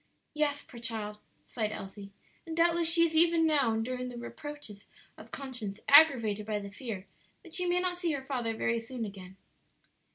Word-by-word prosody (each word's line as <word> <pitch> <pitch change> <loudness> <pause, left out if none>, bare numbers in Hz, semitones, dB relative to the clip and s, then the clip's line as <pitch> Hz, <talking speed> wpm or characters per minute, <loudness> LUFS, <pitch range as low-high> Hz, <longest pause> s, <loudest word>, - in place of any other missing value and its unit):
"Yes, 295 -1 0
poor 235 - -12
child!" 220 -3 -4 0.3
sighed 215 -3 -2
Elsie; 200 -1 -8 0.4
"and 325 0 -5
doubtless 335 0 +4
she 335 0 +5
is 325 -1 -2
even 330 0 +5
now 290 -7 +3
enduring 250 +3 -2
the 245 - -8
reproaches 240 -4 -8 0.3
of - - -13
conscience 240 -7 -5
aggravated 235 -9 +6
by 215 -1 0
the 200 -1 -6
fear 205 -3 -6 0.4
that 340 - -14
she 360 0 0
may 350 0 +2
not 360 -1 -1
see 345 -2 0
her 275 -2 -4
father 245 -5 -2
very 230 +1 +1
soon 230 0 -5
again. 190 -2 -10
250 Hz, 175 wpm, -30 LUFS, 215-320 Hz, 0.4 s, aggravated